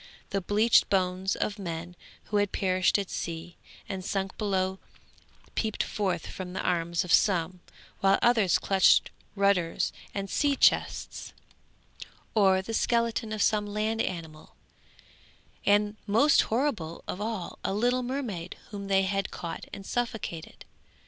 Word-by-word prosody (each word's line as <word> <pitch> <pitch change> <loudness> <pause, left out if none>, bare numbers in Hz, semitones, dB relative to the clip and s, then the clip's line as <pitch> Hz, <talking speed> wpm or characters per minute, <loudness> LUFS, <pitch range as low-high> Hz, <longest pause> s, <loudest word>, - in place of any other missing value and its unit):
The 195 - 0
bleached 210 +5 +4
bones 185 0 +1
of 210 0 -2
men 175 -1 -5 0.3
who 210 - -1
had 205 -1 +1
perished 185 0 +2
at 200 -2 -4
sea 170 +1 -5 0.3
and 190 -1 -4
sunk 195 0 -2
below 190 -2 -1 0.7
peeped 220 -2 -1
forth 185 -5 -2
from 180 -1 -7
the - - -2
arms 170 0 0
of 180 - -1
some, 180 -3 +3 0.4
while 195 -1 +4
others 220 -8 +4
clutched 195 -1 +4 0.2
rudders 200 -4 +1 0.2
and 200 -1 -4
sea 285 +7 +1
chests, - - +1 1.0
or 190 -3 +4
the 225 - -5
skeleton 230 -1 +1
of 215 -1 0
some 210 -1 +2
land 215 +2 -1
animal; 160 -3 -6 1.1
and 205 +1 +3
most 235 +9 +5
horrible 220 - -1
of 185 - -4
all, 215 -5 -4
a - - -1
little 245 +5 +1
mermaid 240 -9 -4
whom 200 -1 -6
they 195 -1 +3
had 195 0 -1
caught 170 -1 -6
and 195 - -8
suffocated. 220 -9 -4
195 Hz, 135 wpm, -28 LUFS, 180-215 Hz, 1.1 s, most